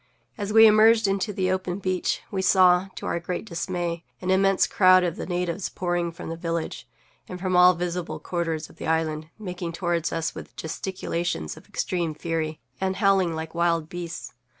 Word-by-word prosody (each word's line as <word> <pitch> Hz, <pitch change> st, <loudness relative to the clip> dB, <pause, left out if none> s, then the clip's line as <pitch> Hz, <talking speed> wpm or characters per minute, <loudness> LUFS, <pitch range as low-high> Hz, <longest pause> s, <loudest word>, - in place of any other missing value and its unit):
As 205 Hz, 0 st, -4 dB
we 225 Hz, +1 st, +8 dB
emerged 220 Hz, 0 st, +6 dB
into 195 Hz, +2 st, 0 dB
the 185 Hz, -2 st, 0 dB
open 185 Hz, -1 st, -2 dB
beach 185 Hz, -2 st, -1 dB
we 190 Hz, -, -1 dB
saw, 185 Hz, -1 st, +5 dB
to -, -, -7 dB
our 170 Hz, -, -1 dB
great 175 Hz, +4 st, -4 dB
dismay, 175 Hz, -2 st, -3 dB, 0.2 s
an 185 Hz, 0 st, -1 dB
immense 195 Hz, 0 st, +4 dB
crowd 185 Hz, -1 st, +5 dB
of 175 Hz, -2 st, -1 dB
the -, -, -6 dB
natives 180 Hz, +1 st, -2 dB
pouring 175 Hz, -1 st, -1 dB
from 165 Hz, -, -8 dB
the 165 Hz, -, -3 dB
village, 165 Hz, -1 st, -4 dB, 0.4 s
and 180 Hz, -, -6 dB
from 185 Hz, 0 st, -1 dB
all 180 Hz, 0 st, +7 dB
visible 175 Hz, -2 st, -3 dB
quarters 165 Hz, -1 st, -3 dB
of -, -, -19 dB
the -, -, -6 dB
island, 160 Hz, -1 st, -1 dB
making 180 Hz, -5 st, -5 dB
toward 170 Hz, -1 st, -1 dB
us 165 Hz, -1 st, -2 dB
with -, -, -10 dB
gesticulations 170 Hz, -, -3 dB
of -, -, -16 dB
extreme 170 Hz, -4 st, -2 dB
fury, 160 Hz, -1 st, -3 dB, 0.2 s
and 190 Hz, 0 st, -1 dB
howling 190 Hz, -5 st, +2 dB
like 160 Hz, 0 st, -5 dB
wild 170 Hz, -2 st, +1 dB
beasts. 175 Hz, -1 st, -6 dB
175 Hz, 180 wpm, -25 LUFS, 165-190 Hz, 0.4 s, we